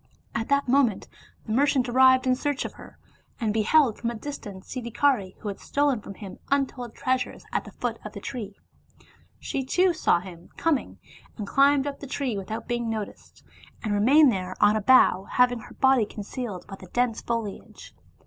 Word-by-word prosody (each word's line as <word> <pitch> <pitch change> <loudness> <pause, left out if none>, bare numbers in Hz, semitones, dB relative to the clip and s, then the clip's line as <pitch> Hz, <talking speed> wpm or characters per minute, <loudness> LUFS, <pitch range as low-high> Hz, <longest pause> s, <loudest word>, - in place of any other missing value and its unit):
At 225 -1 -3
that 280 -1 +2
moment 245 -5 +2 0.4
the - - -6
merchant 265 +1 +2
arrived 260 +1 +5
in 255 0 +3
search 285 +1 -2
of - - -6
her, - - -14 0.4
and 220 -3 0
beheld 225 +3 +3
from 235 - -1
a 235 - -5
distance 215 -7 -8
Siddhikari, 235 -4 0
who - - -6
had 200 - -4
stolen 285 -5 0
from 200 - -9
him 195 -3 -10
untold 265 -4 -1
treasures, 255 -1 -2
at - - -1
the - - -10
foot - - -3
of - - -8
the - - -7
tree. 210 -6 -6 0.8
She, 270 - -3
too, 360 +7 +2
saw 310 - +2
him 175 -2 -12
coming, 325 -5 0 0.4
and 210 - -4
climbed 275 +4 +3
up 285 -1 -4
the 280 - -8
tree 260 -4 -2
without 200 +3 -5
being 240 -1 -2
noticed, 215 -2 -6 0.4
and 215 -2 -1
remained 265 +7 +6
there 185 -3 -4
on 205 +1 +5
a 215 - 0
bough, 200 -5 +5
having 250 -1 +3
her - - -13
body 265 -5 +3
concealed 210 -2 -6
by 195 - -9
the 185 - -13
dense 240 +3 0
foliage. 230 -4 -5
240 Hz, 185 wpm, -26 LUFS, 210-270 Hz, 0.8 s, remained